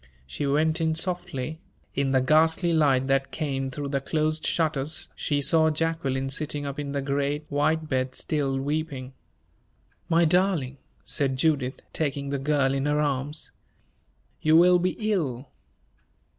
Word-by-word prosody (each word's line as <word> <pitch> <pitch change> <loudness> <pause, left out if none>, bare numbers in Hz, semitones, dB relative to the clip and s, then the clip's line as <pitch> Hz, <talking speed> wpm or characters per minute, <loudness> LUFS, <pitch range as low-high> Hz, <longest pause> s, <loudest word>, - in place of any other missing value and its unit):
She 65 - -3
went 155 +4 +2
in 160 -1 +1
softly. 160 -4 -3 0.3
In 140 0 0
the 130 -1 +3
ghastly 160 +5 +3
light 140 -5 +3
that 135 0 +1
came 135 -4 -2
through 140 +2 -5
the 140 -1 -1
closed 155 +2 -1
shutters 155 -2 0
she 145 -2 -1
saw 160 +2 +3
Jacqueline 150 -4 -1
sitting 145 +1 -1
up 140 0 -5
in 145 -1 -4
the 140 -1 -2
great, 140 +2 -1
white 155 +2 +1
bed, 130 -2 -1
still 140 -3 -1
weeping. 140 -2 -3 1.0
"My 170 0 +4
darling," 160 -6 +1 0.2
said 135 -2 -1
Judith, 135 -3 0
taking 140 -2 -2
the 140 - -1
girl 140 -1 +1
in 135 +1 0
her 150 0 +1
arms, 145 +1 -2 0.9
"you 155 +1 +5
will 180 +1 +6
be 180 +1 0 0.2
ill!" 135 - -2
145 Hz, 145 wpm, -26 LUFS, 135-160 Hz, 1.0 s, will